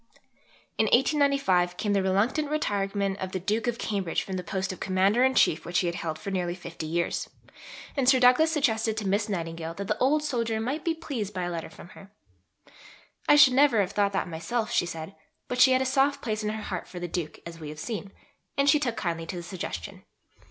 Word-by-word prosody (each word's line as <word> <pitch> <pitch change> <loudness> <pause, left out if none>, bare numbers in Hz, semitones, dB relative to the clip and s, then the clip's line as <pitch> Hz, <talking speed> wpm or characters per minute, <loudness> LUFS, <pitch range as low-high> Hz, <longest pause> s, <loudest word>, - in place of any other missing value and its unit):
In 220 - +4
1895 265 - +2
came 205 -2 0
the 200 - +2
reluctant 210 +11 +1
retirement 200 -8 -1
of 185 0 -5
the 185 - -1
Duke 215 +6 -1
of 235 -1 0
Cambridge 195 -7 -2
from 190 - -5
the 180 - -3
post 190 +1 -3
of - - -11
Commander 195 +5 +2
in 265 0 +3
Chief 160 - +3
which 175 - -2
he - - +2
had 170 0 -2
held 160 -2 -3
for 195 - -6
nearly 175 -2 -1
fifty 170 -3 -7
years, 170 +2 -1 0.7
and 265 -3 +3
Sir 265 -1 +5
Douglas 255 +6 +5
suggested 225 -8 +1
to 210 -3 -2
Miss 205 +3 0
Nightingale 165 -3 -4
that 200 +1 -5
the 210 - 0
old 295 +4 +3
soldier 230 -6 -1
might 265 +8 -3
be 330 -1 0
pleased 235 - -5
by 180 - -2
a 175 - -2
letter 165 -1 -5
from 175 - -13
her. 195 +1 -14 1.2
"I - - +8
should 290 -3 +7
never 270 -4 +5
have 190 -2 +1
thought 200 -1 +1
that 190 - -1
myself," 215 +8 -3
she 175 - +2
said; 165 +2 -7 0.3
but 250 0 0
she 265 - +8
had 260 0 +3
a - - -4
soft 275 +2 +2
place 215 -2 -2
in 210 - -1
her 215 0 -4
heart 185 -4 -5
for 180 - -8
the 175 - -4
Duke, 165 -2 -4
as 170 -1 -9
we 155 -2 -7
have 150 - -8
seen, 200 +3 -5 0.5
and 280 0 +2
she 300 +1 +5
took 245 -5 -2
kindly 165 -3 -3
to - - -5
the 175 - -5
suggestion. 170 - -6
200 Hz, 225 wpm, -27 LUFS, 175-250 Hz, 1.2 s, I